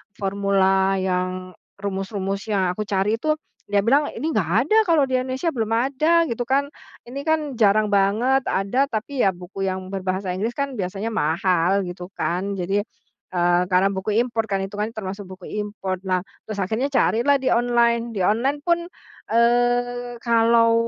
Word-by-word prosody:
formula 195 -1 +2
yang 185 -1 -2 0.2
rumus-rumus 195 0 -4
yang 190 -4 +1
aku 210 +2 -4
cari 205 +3 0
itu, 305 +2 +1 0.3
dia 200 -1 +2
bilang 280 +6 +3
ini 315 +3 -2
nggak 190 - 0
ada 430 +11 +2
kalau 320 -4 +4
di 260 -1 +1
Indonesia, 260 +6 -2
belum 225 -5 -2
ada, 290 +8 +3
gitu 245 -6 -3
kan. 280 +2 +1 0.3
Ini 255 +4 -7
kan 315 0 +3 0.2
jarang 210 0 +4
banget, 220 +7 +2
ada, 245 +9 +1
tapi 255 +3 -4
ya 190 - 0
buku 180 +2 -10
yang 185 0 -4
berbahasa 190 -1 -2
Inggris 215 +6 -2
kan 280 -1 -2
biasanya 195 +4 -3
mahal 180 +1 +1
gitu 180 0 -7
kan, 185 +4 -1
jadi, 195 +3 0 0.5
eee, 175 -1 +2
karena 185 +2 +4
buku 190 +2 -2
impor 235 -2 0
kan, 195 -1 0
itu 195 - -11
kan 210 +1 -1
termasuk 200 -2 -6
buku 185 -1 -11 0.2
impor. 195 -3 -4
Nah, 185 -1 +1 0.3
terus 215 - -4
akhirnya 220 +8 -1
carilah 265 +1 +3
di 260 - -3
online, 235 -1 +2
di 210 - -5
online 255 +8 +1
pun, 340 -1 +2 0.5
eee, 245 +1 +2
kalau, 230 -1 +4
210 Hz, 165 wpm, -22 LUFS, 190-245 Hz, 0.5 s, kalau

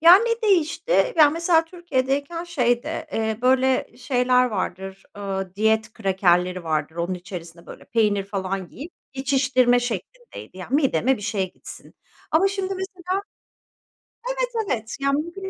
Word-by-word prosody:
Ya, 340 +3 +10
ne 460 +2 0
değişti? 370 +3 +2
Ya, 305 -3 +7
mesela, 330 +1 +2
Türkiye'deyken 325 -1 -2
şeydi, 295 0 -1
eee, 220 -1 -1
böyle 260 0 +3
şeyler 250 -1 +2
vardır, 190 -2 -4
ııı, 195 -2 -4
diyet 220 +1 +1
krakerleri 185 -3 +1
vardır. 155 -1 -1
Onun 170 +2 -1
içerisine, 175 -2 -9
böyle, - - -11
peynir 210 -3 +1
falan 190 -2 -3
yiyip, 310 +7 -9 0.2
geçiştirme 255 -2 +2
şeklindeydi. 245 - -6
Yani, 190 +8 -5
mideme 265 - +2
bir 210 - -10
şey 195 -3 -2
gitsin. - - -11 0.4
Ama 365 +5 +4
şimdi, 390 -1 -3
mesela 380 +1 -5 1.4
Evet, - - -1 0.2
evet, 220 -2 -3
yani, 275 +2 +2
mümkün 385 +3 -7
250 Hz, 135 wpm, -23 LUFS, 195-325 Hz, 1.4 s, Ya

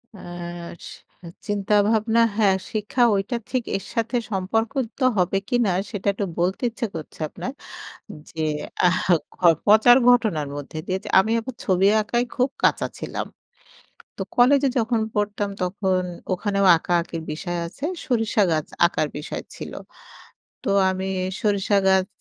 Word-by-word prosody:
আ - - -12 0.7
C 175 - -14 0.2
চিন্তাভাবনা 210 +2 +2 0.2
হ্যাঁ, 200 -4 +4 0.2
শিক্ষাটা 215 +3 0
ওইটা 195 +5 -1
ঠিক 255 -2 -1
এর 195 - -9
সাথে 230 +2 -1 0.2
সম্পর্কিত 225 +6 -2 0.2
হবে 185 +1 +2
কিনা 240 -5 +2 0.2
সেটা 205 -3 -5
একটু 200 +1 -2
বলতে 185 +7 0
ইচ্ছা 230 +1 -3
করছে 155 -2 -8
আপনার 255 - -6 0.8
যে 160 - -4 0.4
আ - - +7 0.8
পচার 220 +4 +7
ঘটনার 210 -12 +2
মধ্যে 145 +2 -7
দিয়ে 185 0 -1 0.2
আমি 220 +4 0
আবার 255 +2 -7
ছবি 190 0 +3 0.2
আঁকায় 240 +3 0
খুব 255 +1 +2
কাঁচা - - +3
ছিলাম। - - -4 0.9
তো - - -3
কলেজে 275 +3 +5
যখন 230 0 +1
পড়তাম, 205 0 -1
তখন 185 0 0 0.3
ওখানেও 200 +1 0
আঁকাআঁকির 170 0 -1
বিষয় 175 +3 -4
আছে। 210 +11 -9 0.2
সরিষা 225 -5 +1
গাছ 155 -2 0 0.2
আঁকার 165 -2 -1
বিষয় 150 - -5
ছিল। - - -8 0.9
তো - - 0 0.2
আমি 190 0 -3 0.3
সরিষা 205 -1 +1
গাছ 190 -1 +4
205 Hz, 130 wpm, -23 LUFS, 185-230 Hz, 0.9 s, আ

